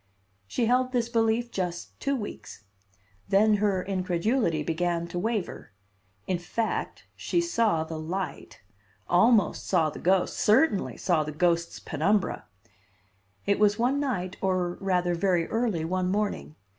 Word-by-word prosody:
She 235 - 0
held 255 +2 +2
this 235 -2 0
belief 230 0 +1
just 180 -2 -4
two 280 0 0
weeks. 205 - -7 0.7
Then 210 +2 +4
her 200 -3 +1
incredulity 185 - 0
began 170 +2 -1
to 175 - -3
waver. 210 - -3 0.5
In 180 -2 -1
fact, 220 +6 -3
she 345 - -1
saw 230 - +1
the 160 0 -6
light; 155 - -5 0.5
almost 215 +5 +3
saw 165 -5 +2
the - - -9
ghost, 185 +1 +2
certainly 215 0 +2
saw 170 -4 +1
the 150 - -5
ghost's 170 +2 0
penumbra. 190 +6 0 1.0
It 200 0 +1
was 205 -1 +4
one 255 +4 +1
night, 190 -10 -2
or 185 -2 0
rather 180 -2 +1
very 175 -1 +1
early, 220 -9 0
one 180 +2 -1
morning. 205 -5 -2
190 Hz, 135 wpm, -27 LUFS, 175-225 Hz, 1.0 s, Then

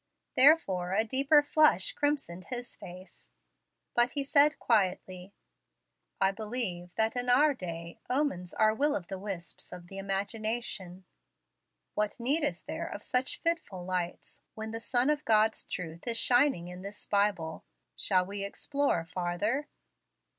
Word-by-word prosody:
Therefore 200 - +5
a 215 +3 +3
deeper 275 +6 +4
flush 295 - +4
crimsoned 280 -12 -2
his 245 -1 -5
face; 180 +2 -12 0.6
but 240 +1 +3
he 285 - -1
said 290 +2 +4
quietly: 185 -3 0 0.8
"I 195 0 +3
believe 210 -5 -4
that, 220 +1 +1
in 245 0 -1
our 290 +4 +5
day, 170 -6 -7
omens 250 -11 0
are 215 -1 +4
will 290 +6 +1
of 175 -3 -5
the 190 - -5
wisps 190 -4 -5
of 175 -1 -10
the 195 - -7
imagination. 200 -1 -3 0.9
What 210 +3 -1
need 280 +7 +2
is 295 - -1
there - - -5
of - - -7
such 250 +1 -1
fitful 330 - -1
lights, 180 -1 -4
when 220 0 -5
the 225 - -4
sun 245 +4 +2
of 300 0 -1
God's 220 -2 +3
truth 170 +2 -6
is 230 -1 +1
shining 245 -7 +3
in 180 +1 -8
this 200 +2 -8
Bible? 200 -6 0 0.3
Shall 180 - +2
we 200 +1 -4
explore 275 - -1
farther?" 180 - -2
210 Hz, 145 wpm, -30 LUFS, 180-255 Hz, 0.9 s, Therefore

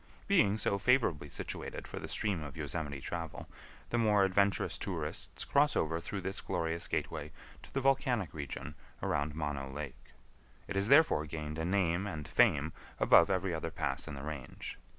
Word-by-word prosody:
Being 160 - +4
so 100 -2 +1
favorably 105 - +2
situated - - -5
for - - -6
the - - -6
stream 100 -6 0
of 70 0 -7
Yosemite 75 -2 -3
travel, 85 +1 -5 0.4
the 120 - +2
more 105 -3 +4
adventurous 100 +1 +2
tourists - - -4
cross 145 +1 +3
over 80 +1 +1
through 100 +3 -5
this 95 +2 -3
glorious 85 -1 -1
gateway - - -2 0.3
to - - -14
the 135 - -1
volcanic 125 - +2
region 70 -3 -5 0.3
around 75 +1 0
Mono 75 -3 -3
Lake. 70 -2 -8 0.5
It 100 - -4
has 100 +1 +2
therefore 140 - +5
gained 75 0 -5
a 80 - -1
name 90 0 +1
and 80 -7 -5
fame 75 +2 +3 0.3
above 85 - +7
every 95 -1 0
other 80 0 -2
pass - - -2
in 75 - -5
the 70 - -7
range. 75 -6 -6
85 Hz, 170 wpm, -33 LUFS, 75-100 Hz, 0.5 s, above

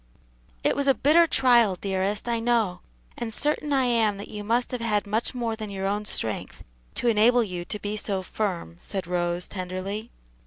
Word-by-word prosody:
"It - - +2
was 280 0 0
a 270 - +5
bitter 330 +4 +5
trial, 240 - +4
dearest, 195 +3 -2
I 235 -1 +1
know; 225 -6 +1 0.4
and 235 -1 -3
certain 295 +4 0
I 270 -2 +3
am 225 -4 +2
that 200 - -8
you 210 -1 -6
must 235 +4 0
have 250 -2 -3
had 210 -3 +1
much 220 +5 -1
more 235 -2 -1
than 215 -2 -6
your 195 -1 -4
own 205 +2 -1
strength 110 - -3 0.3
to 245 - -1
enable 235 +2 +5
you 180 -4 -4
to 210 - -4
be 205 0 -3
so 195 -2 -2
firm," 180 - -3
said 190 -2 -5
Rose, 175 0 -1
tenderly. 190 +4 -5
210 Hz, 190 wpm, -26 LUFS, 190-240 Hz, 0.4 s, a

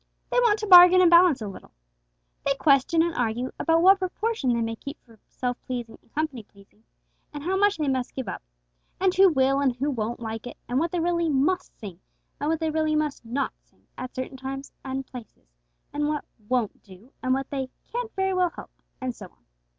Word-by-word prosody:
They - - +3
want 460 -4 +3
to 430 - -4
bargain 360 -1 +9
and 355 -2 +5
balance 340 -8 +6
a - - -4
little. 195 - -10 0.7
They 275 - +1
question 280 +3 +3
and 340 0 -1
argue 245 -1 -2
about 330 +1 +2
what 385 +1 +7
proportion 375 - -1
they 235 -1 0
may 225 0 -2
keep 280 +5 -8
for 225 -3 -20
self 250 -1 -4
pleasing 240 -3 -5
and - - -32
company 305 -5 -2
pleasing, 205 +1 -23 0.5
and 290 -1 -7
how 370 +4 0
much 410 +1 +3
they 305 -2 -1
must 260 -2 -2
'give 260 -5 -4
up'; - - -5 0.6
and 375 -1 +2
who 385 +1 +6
will 270 -3 +2
and 270 -3 +1
who 280 +4 -1
won't 235 -2 -3
like 225 0 -6
it; - - -9
and 245 +2 0
what 335 +3 0
they 355 - -1
'really 340 0 +1
must 305 +7 0
sing,' 190 -5 -9 0.4
and 290 - -1
what 325 -1 0
they 320 -1 -1
'really 310 0 0
must 300 -3 -1
not 250 +4 -2
sing' - - -36
at 255 0 -7
certain 260 +1 -5
times 270 +1 -6
and 265 0 -4
places; 245 - -12 0.5
and 295 0 0
what 300 -1 -2 0.2
'won't 245 -5 -1
do,' 195 +7 -17
and 255 0 +1
what 270 0 -4
they 265 -2 -3
'can't 480 -1 -5
very 385 -1 0
well 365 -1 +2
help,' - - -13 0.2
and 255 -2 -4
so 195 - -10
on. 115 - -32
275 Hz, 215 wpm, -25 LUFS, 245-340 Hz, 0.7 s, bargain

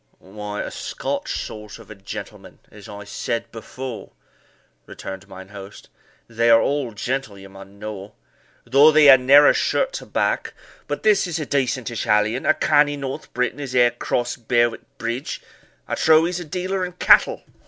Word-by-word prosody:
"Why, 105 +1 -7
a - - -6
Scotch - - -4
sort 105 -1 -9
of 115 -3 -15
a - - -6
gentleman, 100 -1 -10
as 105 -2 -13
I 105 0 -9
said 115 +3 -4
before," 125 +2 -8 0.7
returned 95 +1 -9
mine 95 -1 -12
host; 100 -1 -12 0.4
"they 115 0 +1
are 115 0 +7
all 140 -3 -1
gentle, 120 0 -4
ye 95 - -12
mun 95 +1 -14
know, 105 -1 -8 0.5
though 140 +5 +6
they 150 -3 +8
ha' - - 0
narra 140 +3 +6
shirt - - 0
to - - -7
back; - - -1 0.3
but - - -4
this 210 -3 +3
is 170 -3 -3
a 155 - -3
decentish 130 -4 -2
hallion 105 +4 +1
a - - +4
canny 145 -1 +2
North 135 -1 -6
Briton 125 +2 -1
as 135 -3 -6
e'er 120 -1 +5
cross'd 120 -1 -3
Berwick 120 -1 +2 0.2
Bridge 115 +4 -4 0.5
I - - -5
trow 160 0 +4
he's 175 +1 -2
a 175 - -7
dealer 185 +4 -3
in 180 0 -5
cattle." 180 - +4
120 Hz, 170 wpm, -21 LUFS, 105-145 Hz, 0.7 s, they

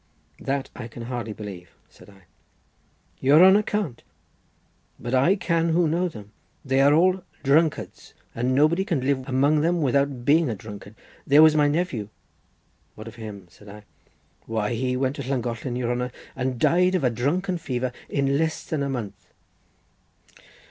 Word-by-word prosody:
"That 135 0 -3
I 120 - -7
can 115 0 -9
hardly 120 -2 -5
believe," 100 -5 -8 0.2
said - - -18
I. 95 -2 -19 1.0
"Your 150 +7 +6
honour 195 +2 +6
can't! 205 - -3 1.0
but 120 - -5
I 135 +9 +4
can 170 -4 0
who 165 +1 +2
know 170 +4 0
them. 105 -8 -12 0.3
They 135 0 +2
are 140 +1 +5
all 185 +4 +3 0.2
drunkards, 150 +3 0 0.2
and 125 +2 -1
nobody 155 +6 +3
can 170 - -1
live 130 0 -1
among 140 +4 +2
them 170 +2 +1
without 140 -3 0
being 155 +1 +4
a 110 - -2
drunkard. 105 0 -11 0.3
There 145 +2 +7
was 155 -1 +6
my 150 -1 +4
nephew—" 145 - -2 0.9
"What 110 +1 -10
of 115 - -9
him?" 105 -4 -8
said 105 - -16
I. 105 +1 -11 0.6
"Why, 110 0 -1
he 125 +2 -1
went 130 +2 -1
to - - -4
Llangollen, 120 -1 -3
your 120 -1 -1
honour, 125 +1 -2 0.2
and 130 -1 -2
died 180 +6 +3
of 180 - 0
a 125 - +2
drunken 170 - -1
fever 130 -5 -3 0.2
in 140 0 0
less 160 0 -1
than 155 -3 -3
a 140 - -1
month." 110 -7 -6
135 Hz, 165 wpm, -24 LUFS, 120-160 Hz, 1.0 s, There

